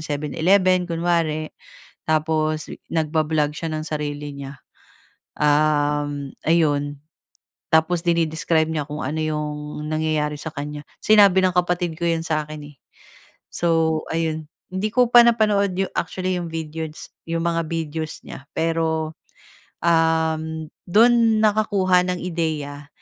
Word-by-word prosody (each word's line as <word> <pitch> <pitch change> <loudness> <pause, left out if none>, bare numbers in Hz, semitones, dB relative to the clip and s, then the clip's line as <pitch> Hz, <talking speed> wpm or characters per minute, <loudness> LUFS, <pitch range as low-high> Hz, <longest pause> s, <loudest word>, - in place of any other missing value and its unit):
Seven 150 -1 -3
Eleven 185 +2 +3
kunwari, 165 -2 0 0.6
tapos 155 0 0 0.2
nagba-blog 155 -2 +1
siya 165 -1 -4
ng 155 0 -3
sarili 150 -1 -4
niya, 140 0 -8 0.8
uhm, 145 -1 +1
ayun 145 -3 +1 0.7
tapos 160 +2 +3
dine-describe 165 -1 +2
niya 150 -3 -2
kung 150 +1 -5
ano 150 +4 -3
'yong 150 -1 -4
nangyayari 155 -1 0
sa - - -4
kanya. 145 0 -5 0.2
Sinabi 200 -3 +6
ng 185 - +3
kapatid 175 -2 0
ko 170 - -1
'yan 165 -1 0
sa 155 -2 0
akin 150 -1 -8
eh, - - -38 0.8
so 165 -2 +1
ayun, 160 -1 -2 0.2
hindi 190 +3 -1
ko 250 -2 +4
pa 240 - +10
napanood 210 -5 +2 0.2
actually 185 0 -1
'yong 170 - -5
videos, 160 -1 -6 0.2
'yong 165 0 -1
mga 165 -1 0
videos 160 -1 -4
niya 135 - -10
pero, 160 -1 0 0.7
uhm, 160 -1 +1 0.2
do'n 225 +2 +5
nakakuha 200 -4 +3
ng 180 -1 -2
ideya 155 -5 -3
160 Hz, 125 wpm, -22 LUFS, 150-175 Hz, 0.8 s, pa